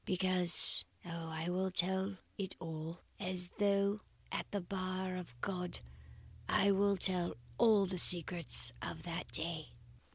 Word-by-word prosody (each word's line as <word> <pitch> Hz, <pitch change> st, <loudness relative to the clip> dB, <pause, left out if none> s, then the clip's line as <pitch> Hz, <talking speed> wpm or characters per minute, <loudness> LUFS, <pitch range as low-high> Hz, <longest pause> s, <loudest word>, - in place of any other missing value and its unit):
Because 185 Hz, -2 st, +2 dB, 0.2 s
Oh, 165 Hz, -1 st, -5 dB
I 160 Hz, +1 st, -3 dB
will 185 Hz, +1 st, 0 dB
tell 190 Hz, +2 st, 0 dB, 0.2 s
it 195 Hz, -2 st, -3 dB
all; 165 Hz, 0 st, -6 dB, 0.2 s
as 180 Hz, -1 st, 0 dB
though 200 Hz, 0 st, +2 dB, 0.3 s
at -, -, -3 dB
the 205 Hz, -, -1 dB
bar 185 Hz, 0 st, -3 dB
of 165 Hz, -10 st, -8 dB
God. 180 Hz, -2 st, -2 dB, 0.7 s
I 200 Hz, -, +4 dB
will 200 Hz, 0 st, +3 dB
tell 180 Hz, -1 st, +1 dB, 0.2 s
all 215 Hz, -4 st, +6 dB
the 185 Hz, -1 st, -3 dB
secrets 170 Hz, -8 st, +5 dB
of -, -, -5 dB
that 170 Hz, 0 st, -5 dB
day. 160 Hz, -1 st, -3 dB
185 Hz, 135 wpm, -36 LUFS, 170-190 Hz, 0.7 s, all